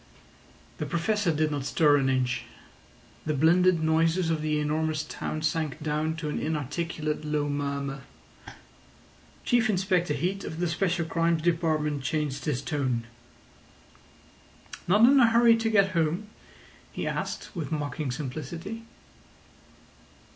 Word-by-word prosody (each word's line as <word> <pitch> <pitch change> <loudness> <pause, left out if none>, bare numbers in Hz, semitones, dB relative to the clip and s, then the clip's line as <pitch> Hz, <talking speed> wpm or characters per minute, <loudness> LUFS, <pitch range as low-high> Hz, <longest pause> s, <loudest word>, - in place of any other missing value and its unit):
The - - -2
Professor 180 +2 +1
did 155 0 0
not 145 -2 -2
stir 145 +1 +4
an 135 -1 +1
inch. 125 -2 0 0.8
The 155 - +1
blended 170 +3 +4
noises 165 +2 +2
of 160 -2 -1
the 155 -1 0
enormous 155 +1 0
town 155 0 -5
sank 155 -1 -1
down 155 +1 -1
to 160 -2 -4
an - - -2
inarticulate 155 +1 -3
low 150 -1 -1
murmur. 140 -1 -3 1.4
Chief 240 -2 +3
Inspector 185 -4 +1
Heat 185 +7 -2
of 160 - -6
the 175 - +1
Special 170 0 0
Crimes 165 0 +1
Department 155 -4 +1
changed 140 0 -2
his 145 -4 -1
tone. 130 -6 -1 1.8
"Not 205 +6 +6
in 275 +1 +6
a 240 - +7
hurry 230 0 +6
to 225 0 0
get 195 -3 +3
home?" 170 +4 0 0.6
he - - -4
asked, - - -4
with 155 -6 -4
mocking 150 -1 -3
simplicity. 155 - -5
160 Hz, 130 wpm, -27 LUFS, 150-175 Hz, 1.8 s, a